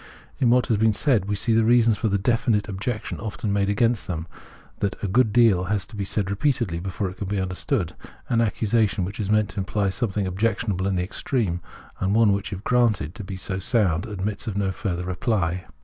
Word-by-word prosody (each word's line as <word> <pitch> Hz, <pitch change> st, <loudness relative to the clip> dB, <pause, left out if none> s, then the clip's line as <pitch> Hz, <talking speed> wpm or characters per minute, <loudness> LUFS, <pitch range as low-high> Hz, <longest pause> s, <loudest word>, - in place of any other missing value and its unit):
In 125 Hz, -, +3 dB
w^hat 125 Hz, +1 st, +4 dB
has 115 Hz, -5 st, +1 dB
been 110 Hz, +1 st, +3 dB
said 120 Hz, -9 st, +2 dB
we 100 Hz, +1 st, -1 dB
see 115 Hz, +3 st, 0 dB
the 115 Hz, 0 st, +4 dB
reason 115 Hz, 0 st, +5 dB
for 110 Hz, -, -1 dB
the 100 Hz, -1 st, +2 dB
definite 115 Hz, 0 st, +1 dB
objection 105 Hz, +3 st, -4 dB
often 105 Hz, -2 st, -3 dB
made 100 Hz, -1 st, +1 dB
against 115 Hz, +2 st, +1 dB
them, 80 Hz, -3 st, -3 dB, 0.5 s
that 100 Hz, -, -1 dB
a -, -, +1 dB
good 110 Hz, +3 st, +3 dB
deal 105 Hz, -6 st, +4 dB
has 100 Hz, +1 st, -1 dB
to 115 Hz, -, -12 dB
be 100 Hz, -1 st, -3 dB
read 100 Hz, -2 st, 0 dB
repeatedly 110 Hz, -, 0 dB
before 95 Hz, +1 st, -3 dB
it 95 Hz, -, -13 dB
can 100 Hz, -, -4 dB
be 100 Hz, 0 st, -1 dB
understood 90 Hz, -2 st, -1 dB, 0.2 s
— -, -, -26 dB
an 115 Hz, -, +1 dB
accusa 110 Hz, 0 st, +2 dB
tion 95 Hz, -2 st, -2 dB
which 100 Hz, +4 st, -7 dB
is 100 Hz, -2 st, -2 dB
meant 105 Hz, -1 st, +3 dB
to 105 Hz, -, -5 dB
imply 100 Hz, +1 st, 0 dB
something 105 Hz, -2 st, -1 dB
objectionable 100 Hz, 0 st, 0 dB
in 100 Hz, -, 0 dB
the 90 Hz, -, 0 dB
extreme, 95 Hz, -2 st, -2 dB, 0.4 s
and 95 Hz, +2 st, +1 dB
one 110 Hz, -3 st, +5 dB
which 100 Hz, 0 st, -3 dB
if 100 Hz, 0 st, -6 dB
granted 115 Hz, -10 st, +2 dB
to 100 Hz, -, -8 dB
be 95 Hz, 0 st, -6 dB
sound 95 Hz, -1 st, 0 dB
admits 105 Hz, +2 st, -4 dB
of 105 Hz, -2 st, -2 dB
no 100 Hz, -2 st, +1 dB
further 90 Hz, -2 st, -3 dB
reply. 90 Hz, -2 st, -1 dB
100 Hz, 220 wpm, -24 LUFS, 95-115 Hz, 0.5 s, reason